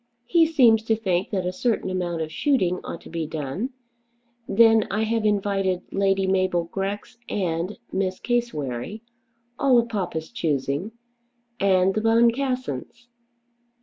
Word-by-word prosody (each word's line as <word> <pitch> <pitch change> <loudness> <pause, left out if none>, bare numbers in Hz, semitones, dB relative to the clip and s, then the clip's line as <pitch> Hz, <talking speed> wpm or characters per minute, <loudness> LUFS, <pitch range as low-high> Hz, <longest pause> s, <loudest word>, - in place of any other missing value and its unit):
He 330 +5 +4
seems 245 -8 +5
to 225 - +2
think 190 -3 -1
that 190 -4 -2
a 180 - 0
certain 225 -3 -1
amount 175 -3 -2
of 155 - -7
shooting 185 - +1
ought 170 - -6
to - - -13
be 165 -2 -3
done. 155 - -3 0.8
Then 225 0 +5
I 215 +2 0
have 225 0 0
invited 195 -3 0
Lady 195 0 +1
Mabel 185 -2 +1
Grex 195 +6 -5
and 175 0 -2
Miss 190 -1 -1
Cassewary, 215 - -2 0.6
all 265 -3 +4
of 235 0 +2
papa's 175 -7 -3
choosing, 150 - -2 0.7
and 190 -1 +3
the 215 - -1
Boncassens. 235 - 0
195 Hz, 135 wpm, -24 LUFS, 175-230 Hz, 0.8 s, seems